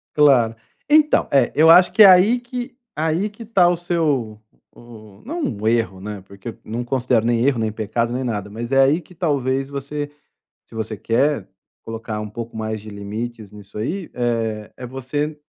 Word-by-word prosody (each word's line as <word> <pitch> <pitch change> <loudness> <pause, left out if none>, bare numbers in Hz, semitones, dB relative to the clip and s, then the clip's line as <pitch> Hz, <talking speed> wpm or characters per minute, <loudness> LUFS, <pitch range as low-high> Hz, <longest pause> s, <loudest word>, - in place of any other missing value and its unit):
Claro. 130 -7 +4 0.3
Então 300 0 +4
é 135 -3 +3
eu 160 +2 +6
acho 180 +1 +7
que 220 - +7
é - - +11
aí 190 +6 +6
que 245 0 -6 0.2
aí 160 +6 0
que 210 +3 -11
ta 195 -6 +4
o 175 - +2
seu 150 -11 -1 0.3
o - - -16
o 110 -4 -14
não 300 - -3
o 110 - -3
erro, 115 -5 0
né, 105 0 -7
porque 100 +4 -8
eu - - -15
não 115 +3 -4
considero 120 -2 +1
nem 120 0 +2
erro, 135 -3 +2
nem 110 -1 -1
pecado, 115 +2 -2
nem 125 +2 -2
nada, 105 -4 -3
mas 115 +3 -6
é 135 - +5
aí 140 +5 +4
que 175 - -18
talvez 135 -5 -1
você 140 +1 -5 0.6
se - - -15
você 110 0 -4
quer 120 0 0 0.3
colocar 115 -1 -5
um 105 - -6
pouco 115 +2 -7
mais 110 0 -3
de 110 - -10
limites 105 +1 -6
nisso 105 -1 -12
aí, 165 - -3
eh, 115 -3 -2
é 125 - -7
você 145 +4 -3
120 Hz, 195 wpm, -21 LUFS, 110-155 Hz, 0.6 s, é